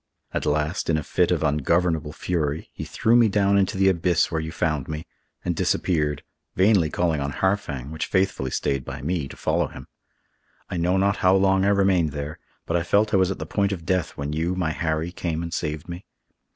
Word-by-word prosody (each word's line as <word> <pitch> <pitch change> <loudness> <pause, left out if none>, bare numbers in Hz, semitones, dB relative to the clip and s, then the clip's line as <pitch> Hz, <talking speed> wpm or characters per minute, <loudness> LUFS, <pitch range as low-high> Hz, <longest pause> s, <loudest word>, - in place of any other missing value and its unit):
At - - -2
last, 75 +3 0
in 80 - +3
a 75 - -2
fit - - +1
of - - +1
ungovernable 80 +2 +1
fury, 80 -2 -2
he - - -6
threw 115 +2 +2
me 120 -2 +6
down 100 0 +2
into 95 -1 +2
the 95 0 +4
abyss 85 -2 +2
where 80 -1 -1
you 80 0 -5
found 75 -5 -1
me, 80 +1 -5 0.4
and 90 -1 0
disappeared, 75 -4 0 0.3
vainly 95 -4 +4
calling 80 -3 0
on 70 +1 -2
Harfang, 75 -9 -1
which 80 - -3
faithfully 95 -9 0
stayed 70 +1 -1
by 60 - -7
me, 80 -2 -1
to - - -11
follow - - 0
him. - - -11 0.9
I - - -2
know 90 +3 +2
not 100 +2 +2
how 95 +1 +4
long 95 0 +3
I - - +4
remained 95 -6 +2
there, 75 +2 -5 0.3
but 85 - -1
I 85 - +2
felt 100 +5 +2
I - - +5
was 95 -1 +3
at 95 - -3
the - - -5
point 100 -1 0
of 85 -4 -5
death 90 -2 -1
when 70 +1 -3
you, 85 +4 -1
my 90 -4 0
Harry, 80 +1 -2
came 85 -2 -3
and 85 0 -5
saved 75 -2 -3
me. 85 +2 -7
85 Hz, 215 wpm, -24 LUFS, 75-95 Hz, 0.9 s, me